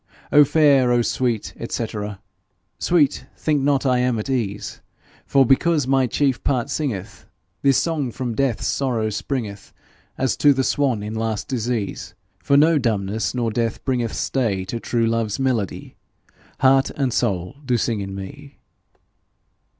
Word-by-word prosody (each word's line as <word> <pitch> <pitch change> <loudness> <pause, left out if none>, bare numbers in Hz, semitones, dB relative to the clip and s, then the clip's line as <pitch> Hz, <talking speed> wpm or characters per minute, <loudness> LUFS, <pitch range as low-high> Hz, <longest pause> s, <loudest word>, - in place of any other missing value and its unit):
O 150 - +8
fair, 140 -4 +4
O 120 -1 +3
sweet, 120 -3 -1 0.2
&c. 115 - -2 0.9
Sweet, 150 -5 +2
think 150 -3 0
not 140 0 +1
I 125 -1 +3
am 125 -2 +1
at 110 +5 -3
ease, 105 -6 -3 0.5
For 135 -1 +4
because 145 +3 +3
my 135 -1 +2
chief 135 +1 0
part 130 0 0
singeth; 120 -12 -4 0.4
This 135 -2 +4
song 155 -6 0
from 120 -1 -4
death's 125 -4 0
sorrow 120 -5 0
springeth, 105 -3 -4 0.5
As 130 -2 0
to 145 -2 +5
Swan 130 -7 0
in 105 +1 -5
last 110 -1 -2
disease; 120 -4 -3 0.2
For 140 +9 +2
no 155 +1 +5
dumbness 110 -2 -1
nor 120 -2 0
death 115 0 -2
bringeth 120 -4 -1
Stay 105 -8 -1
to 115 +5 -4
true 115 0 0
love's 115 -2 0
melody: 125 -8 -2 0.7
Heart 135 0 +4
and 135 -4 0
soul 100 0 -1
do 125 -3 +1
sing 115 -1 -1
in 95 -1 -5
me. 140 +9 -9
125 Hz, 145 wpm, -22 LUFS, 110-135 Hz, 0.9 s, O